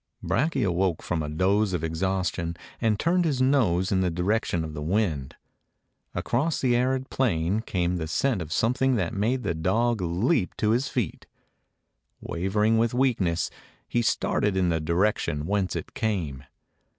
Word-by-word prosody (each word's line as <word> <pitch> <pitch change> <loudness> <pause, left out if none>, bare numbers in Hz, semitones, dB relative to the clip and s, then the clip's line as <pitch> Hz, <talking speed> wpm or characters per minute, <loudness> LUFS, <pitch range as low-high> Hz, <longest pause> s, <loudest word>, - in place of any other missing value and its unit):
Brakje 140 0 +1
awoke 90 -2 0
from 85 -2 -1
a 75 - -3
doze 95 +5 +1
of 85 -3 -2
exhaustion 85 0 -1 0.2
and 110 -3 +1
turned 175 +2 +2
his 145 -6 0
nose 110 -9 +2
in 95 -1 +2
the 90 - +2
direction 90 0 0
of 80 -1 -6
the 75 - -5
wind. 80 -5 -1 0.8
Across 145 +7 0
the 125 -2 +3
arid 130 +2 0
plain 100 -6 +1
came 90 -4 -1
the 80 -2 -3
scent 120 - 0
of 80 -2 -6
something 125 +6 +2
that 95 -1 -1
made 120 +5 0
the - - 0
dog 110 +7 +1
leap 90 - 0
to 105 - +2
his 125 +4 +1
feet. 115 -10 -3 0.9
Wavering 105 +5 +1
with 115 +1 +1
weakness, 110 -10 +1 0.4
he 120 - +1
started 105 -3 +1
in 90 -2 +2
the 80 -1 +1
direction 85 -2 0
whence 100 0 0
it - - -5
came. 80 -12 -2
95 Hz, 160 wpm, -26 LUFS, 85-120 Hz, 0.9 s, the